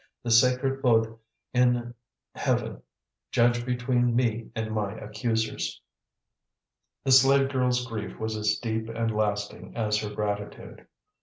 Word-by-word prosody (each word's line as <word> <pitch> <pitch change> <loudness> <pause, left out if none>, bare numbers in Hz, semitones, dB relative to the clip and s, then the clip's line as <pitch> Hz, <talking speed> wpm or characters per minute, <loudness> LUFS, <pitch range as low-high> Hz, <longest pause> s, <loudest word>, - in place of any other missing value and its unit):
The 120 - -2
sacred 125 +3 +3
Buddh 115 -3 +3 0.4
in 125 -1 +2 0.4
heaven - - -1 0.5
judge 120 0 +2
between 125 -1 +1
me 115 -2 0
and 110 0 -3
my 105 -2 -1
accusers!" 110 +1 -2 1.2
The 135 - +1
slave 135 +1 +6
girl's 125 -2 +1
grief 110 -4 -6
was 110 0 -2
as 105 0 +1
deep 110 -1 -3
and 115 -1 -2
lasting 105 -1 -2
as 105 -2 +1
her 105 - -4
gratitude. 105 -1 -5
115 Hz, 125 wpm, -27 LUFS, 110-125 Hz, 1.2 s, slave